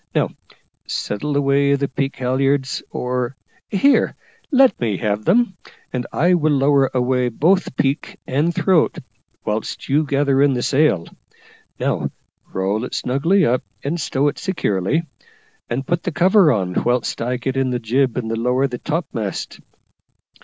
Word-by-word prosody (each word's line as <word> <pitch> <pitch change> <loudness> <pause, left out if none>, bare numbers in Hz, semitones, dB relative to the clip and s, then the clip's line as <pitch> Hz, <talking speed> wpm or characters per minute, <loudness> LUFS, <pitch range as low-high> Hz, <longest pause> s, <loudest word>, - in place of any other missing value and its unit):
Now - - +2 0.6
settle 140 +8 -2
away 140 0 +3
the 140 0 -1
peak 135 +1 -3
halliards, 130 +1 0
or 125 +1 -2 0.3
here, 270 +8 +3 0.3
let 265 - +4
me 110 -5 0
have 105 -1 -2
them, 200 -1 +2 0.4
and 125 -1 -2
I 175 +4 +3
will 155 -3 +2
lower 140 -1 +3
away 125 0 +1
both 170 - +1
peak 135 +2 -1
and 145 +6 +1
throat, 175 -1 +2 0.5
whilst 105 +1 -3
you 145 +3 +3
gather 140 -1 +2
in 140 -2 +4
the 120 - -2
sail. 135 - +2 0.7
Now - - -1 0.4
roll 100 +4 -1
it 125 - -5
snugly 165 +10 +2
up, 125 +2 +2 0.2
and 160 +4 -2
stow 140 0 0
it 145 - -2
securely, 150 - 0 0.7
and 130 +3 -2
put 175 +3 0
the 180 - -3
cover 180 +1 +5
on, 95 -6 0
whilst 120 -1 0
I 125 +2 -1
get 130 +2 -3
in 135 -1 +1
the 125 - 0
jib 125 +2 0
and 120 -3 -2
lower 125 +4 +1
the 125 -3 -4
topmast. 145 - -4
135 Hz, 150 wpm, -20 LUFS, 125-155 Hz, 0.7 s, cover